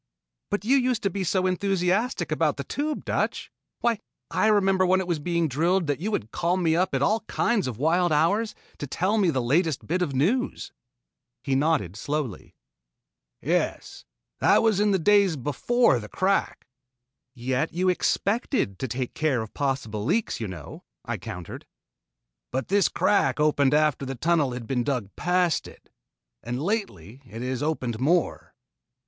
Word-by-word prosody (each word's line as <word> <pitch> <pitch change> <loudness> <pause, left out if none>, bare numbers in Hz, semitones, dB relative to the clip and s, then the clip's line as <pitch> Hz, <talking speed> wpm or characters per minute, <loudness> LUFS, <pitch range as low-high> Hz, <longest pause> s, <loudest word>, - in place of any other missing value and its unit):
"But 205 0 -2
you 265 +4 +4
used 250 -3 0
to 200 - +1
be 195 +1 -2
so 185 +2 +1
enthusiastic 190 +5 0
about - - +1
the - - -3
Tube, 300 +1 -3
Dutch! - - -2 0.3
Why 235 -3 +1 0.3
I - - +2
remember 195 -3 +3
when 185 +1 +3
it 190 - -2
was 170 -3 -1
being 170 +1 0
drilled 170 +6 +1
that 145 -1 -1
you 200 +6 -2
would 110 - -3
call 175 +2 0
me 165 -3 +2
up 180 -4 +1
at 135 - +1
all 215 +10 +2
kinds 230 - +1
of 120 -4 -4
wild 170 +5 +2
hours 200 +9 +2 0.2
to 145 - -4
tell 190 +10 0
me 190 -4 +3
the 130 -5 0
latest 155 +4 +1
bits 180 +3 -1
of 140 -6 -3
news." 210 - 0 0.7
He 135 - -1
nodded 135 - +1
slowly. 140 -2 -4 0.9
"Yes, - - -1 0.4
that - - +4
was 220 -4 +3
in 210 0 +3
the 195 - +3
days 200 0 +4
before 145 - +2
the 105 -1 -9
crack." 195 +1 0 0.7
"Yet 130 +5 -1
you 180 +2 -1
expected 195 - 0
to 130 - -2
take 125 +1 -4
care 140 -7 0
of 110 - -11
possible 130 -7 -2
leaks, 205 - 0
you 110 - -3
know," 85 -6 -9 0.2
I - - -3
countered. 90 -1 -8 0.8
"But 130 -1 -3
this 200 +1 +3
crack 150 -10 +2
opened 145 -2 +3
after 150 -2 +2
the 135 - -4
tunnel 150 -1 +1
had 120 -1 -6
been 125 0 -1
dug 120 -7 -3
past 180 -2 +1
it, - - -17 0.5
and 120 +2 -4
lately 140 - -3
it 115 +2 -7
has 130 -1 -3
opened 130 -7 -2
more." 165 +6 0
165 Hz, 170 wpm, -25 LUFS, 130-195 Hz, 0.9 s, you